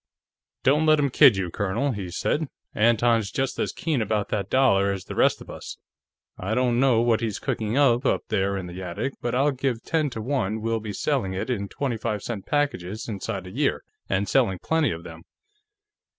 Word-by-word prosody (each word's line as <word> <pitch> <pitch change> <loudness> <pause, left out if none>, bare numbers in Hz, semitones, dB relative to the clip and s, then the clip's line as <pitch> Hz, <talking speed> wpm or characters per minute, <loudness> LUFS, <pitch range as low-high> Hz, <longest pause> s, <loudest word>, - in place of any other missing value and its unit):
"Don't 150 +4 +3
let 155 0 +6
him 140 -2 +1
kid 130 -6 +7
you, 90 -3 -2
Colonel," 100 +9 -1
he 100 -6 -5
said. 150 - -1 0.3
"Anton's 115 -1 +3
just 135 -1 -2
as - - 0
keen 155 -7 -1
about 105 -1 -1
that 100 -3 -2
dollar 100 -7 +3
as 95 -2 -5
the - - -6
rest - - +2
of - - -12
us. - - -8 0.6
I 100 +5 -2
don't 125 -1 +2
know 125 -4 +4
what 115 -1 +2
he's 110 -4 -2
cooking 110 +3 -2
up, 130 -3 +4
up - - +1
there 100 -2 0
in 95 - -4
the 90 +1 -7
attic, 95 +9 -3
but 120 0 -1
I'll 140 +3 +3
give 130 -3 -2
ten 155 -3 0
to 115 - -6
one 110 -3 -1
we'll 115 +1 -1
be 110 -1 -6
selling 110 -2 -1
it 95 +7 -2
in 100 -5 -2
twenty 130 -5 -2
five 110 -2 -3
cent 110 -5 -5
packages 115 -9 -1
inside 100 -2 -4
a 90 - -9
year, 140 +6 0 0.3
and 95 +1 0
selling 95 0 +2
plenty 160 - +1
of 85 0 -5
them.... 80 -1 -10
115 Hz, 205 wpm, -25 LUFS, 100-135 Hz, 0.6 s, kid